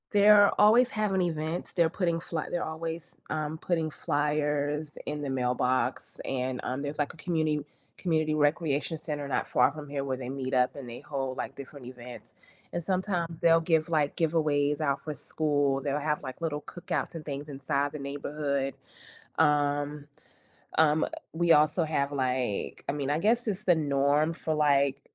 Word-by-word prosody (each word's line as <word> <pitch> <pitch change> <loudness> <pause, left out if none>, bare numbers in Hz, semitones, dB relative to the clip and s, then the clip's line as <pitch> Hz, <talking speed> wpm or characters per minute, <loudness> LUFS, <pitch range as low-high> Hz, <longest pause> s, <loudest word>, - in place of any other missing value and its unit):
They're 205 0 +7
always 235 +4 +6
having 210 -4 0
events, 160 -1 -2
they're 170 -2 +3
putting 170 -1 0
fly 165 -2 -4
they're 175 - -1
always, 160 +1 -5
um, 155 0 -2
putting 165 -1 -1
flyers 150 0 -1
in 150 0 -3
the 145 - -3
mailbox, 125 0 0
and, 130 -1 -2
um, 130 +2 -2
there's, 145 +1 -4
like, 145 - 0
a - - -17
community 155 -3 0 0.3
community 155 -3 +1
recreation 150 0 +1
center 150 -2 -4
not 140 - -1
far - - +4
from 150 0 -8
here 140 -1 -3
where 130 -1 -2
they 125 -1 -6
meet 130 -1 -3
up 125 0 +2
and 135 -4 -8
they 120 - -7
hold, 135 -2 -3
like, - - -4
different 140 -1 -10
events. 125 -1 -10 0.4
And 175 - -2
sometimes, 180 -3 -1
they'll 165 -1 +5
give, 160 -1 +2
like, 150 -3 +1
giveaways 150 -3 +1
out 140 -2 0
for 155 - -4
school, 145 -2 0
they'll 140 +1 -1
have, 150 0 -1
like, 130 +5 -7
little 150 -3 -2
cookouts 175 +2 -4
and 160 - -6
things 145 0 -5
inside 140 0 -1
the 150 - -6
neighborhood. 140 0 -2 0.7
Um, 145 -1 +2 0.7
um, 155 0 +4 0.3
we 170 +1 +2
also 155 +3 +5
have, 145 -3 0
like 130 -5 -1
I - - +1
mean, 140 -2 -2
I 150 +2 +1
guess 230 +6 +2
it's 210 0 -2
the 175 - +5
norm 145 +1 +2
for, 160 -1 -2
like, 140 -2 +3
150 Hz, 170 wpm, -29 LUFS, 140-165 Hz, 0.7 s, They're